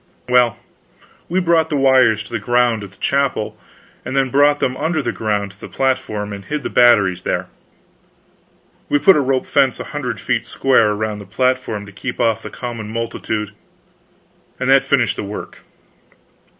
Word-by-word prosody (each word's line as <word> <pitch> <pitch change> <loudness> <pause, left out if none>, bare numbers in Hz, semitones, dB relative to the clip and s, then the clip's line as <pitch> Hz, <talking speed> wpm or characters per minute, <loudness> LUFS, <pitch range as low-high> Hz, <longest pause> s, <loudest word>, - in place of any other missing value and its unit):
Well, 125 -2 +3 0.7
we 180 +3 +1
brought 165 -3 +2
the 150 - -1
wires 130 -6 +4
to 100 - -15
the 115 - -1
ground 120 0 +1
at 100 - -8
the 95 - -23
chapel, 135 -6 -1 0.5
and 130 - -5
then 135 -2 +1
brought 145 +1 +4
them 130 - 0
under 160 +3 -1
the 140 - -1
ground 105 -2 -2
to 100 - -23
the - - -7
platform, 110 -6 -2
and 100 0 -8
hid 150 +3 -4
the - - -4
batteries 105 -7 +4
there. - - -2 1.4
We - - +3
put 190 +6 +6
a 150 - +3
rope 130 -1 0
fence 135 -3 +2
a - - -4
hundred 125 -7 -3
feet - - -1
square 130 -5 +3
around 105 0 -2
the 100 - -10
platform 125 -2 -1
to 100 - -12
keep 120 +5 -6
off 115 -2 +1
the - - -8
common 115 -4 -6
multitude, 110 -2 -3 1.1
and 130 +1 +1
that 135 0 +6
finished 130 -5 +1
the - - -3
work. 100 +1 -7
120 Hz, 175 wpm, -18 LUFS, 105-135 Hz, 1.4 s, put